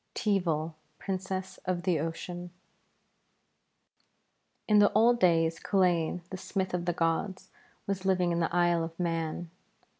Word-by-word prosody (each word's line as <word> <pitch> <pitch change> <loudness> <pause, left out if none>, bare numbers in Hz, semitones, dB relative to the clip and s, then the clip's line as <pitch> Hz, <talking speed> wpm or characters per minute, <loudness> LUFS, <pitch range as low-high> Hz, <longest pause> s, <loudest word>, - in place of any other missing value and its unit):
TEEVAL, 170 -7 0 0.2
PRINCESS 190 0 -4
OF 180 -1 -1
THE 175 -5 +1
OCEAN 175 +3 -5 2.2
In 210 -1 +5
the 205 - +5
old 235 +3 +4
days 165 -3 +3
Culain, 180 -3 +1
the 185 - -4
smith 190 0 -3
of 175 -1 -1
the 175 - +2
gods, 180 +3 -1 0.3
was 195 -1 -2
living 185 -2 +2
in 170 - 0
the 165 - 0
Isle 175 -1 +2
of 165 +1 -7
Mann. 165 -1 -2
175 Hz, 130 wpm, -29 LUFS, 165-190 Hz, 2.2 s, In